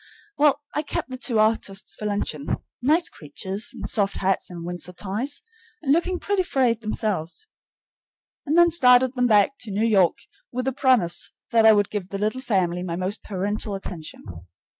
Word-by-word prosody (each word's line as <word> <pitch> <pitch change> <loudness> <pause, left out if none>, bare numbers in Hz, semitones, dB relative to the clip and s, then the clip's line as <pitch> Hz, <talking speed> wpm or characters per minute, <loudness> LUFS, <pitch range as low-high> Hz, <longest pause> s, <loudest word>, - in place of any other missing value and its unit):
Well, 290 0 +3
I 300 - 0
kept 290 - -4
the - - -3
two 250 -3 0
artists 215 -2 +1
for 210 - -5
luncheon, 160 -8 -2 0.3
nice 310 +7 +3
creatures 190 +7 -3
in - - -8
soft 200 -3 0
hats 190 0 0
and 170 -2 -8
Windsor 175 +1 -4
ties, 210 +10 -4 0.4
and 275 - +1
looking 360 +3 +1
pretty 400 +1 0
frayed 255 -9 +1
themselves, 215 - -3 1.0
and 305 +3 0
then 345 0 +6
started 250 -5 +5
them 250 -2 +2
back 210 +3 +4
to 220 - -7
New 205 +3 0
York 195 -6 +3 0.3
with 250 0 -3
the 265 - 0
promise 240 -11 +2 0.2
that 225 -1 +5
I 220 - +9
would 205 -2 +1
give 200 -3 -4
the 200 - -4
little 215 +5 -1
family 180 -7 0
my 175 -2 -3
most 185 +4 -3
parental 205 +1 -3
attention. 170 -5 -7
215 Hz, 175 wpm, -24 LUFS, 190-260 Hz, 1.0 s, I